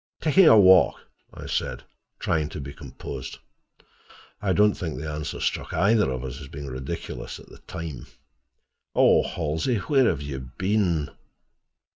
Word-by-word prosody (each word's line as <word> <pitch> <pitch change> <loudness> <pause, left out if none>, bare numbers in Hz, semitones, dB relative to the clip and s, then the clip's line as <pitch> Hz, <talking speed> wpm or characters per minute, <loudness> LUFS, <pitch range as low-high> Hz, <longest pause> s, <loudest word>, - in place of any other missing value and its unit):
"Taking 165 +3 +5
a 110 - +8
walk," 95 -2 +6 0.4
I - - -10
said, - - -3 0.3
trying 80 -3 0
to - - -7
be 70 0 -7
composed. 70 -2 -8 1.0
I 100 - 0
don't 105 +2 +4
think 80 -7 -5
the 80 +3 -5
answer 75 0 -4
struck - - -2
either 105 +2 +3
of 65 -2 -3
us 65 -2 -6
as 70 - -9
being 70 +1 -8
ridiculous 65 -1 -6
at - - -16
the - - -14
time. 75 -6 -7 0.9
"Oh, - - +5
Halsey, 80 - -1
where 135 +6 +2
have 75 -5 0
you 70 -2 -5 0.2
been?" 95 -6 +1
80 Hz, 150 wpm, -25 LUFS, 70-100 Hz, 1.0 s, a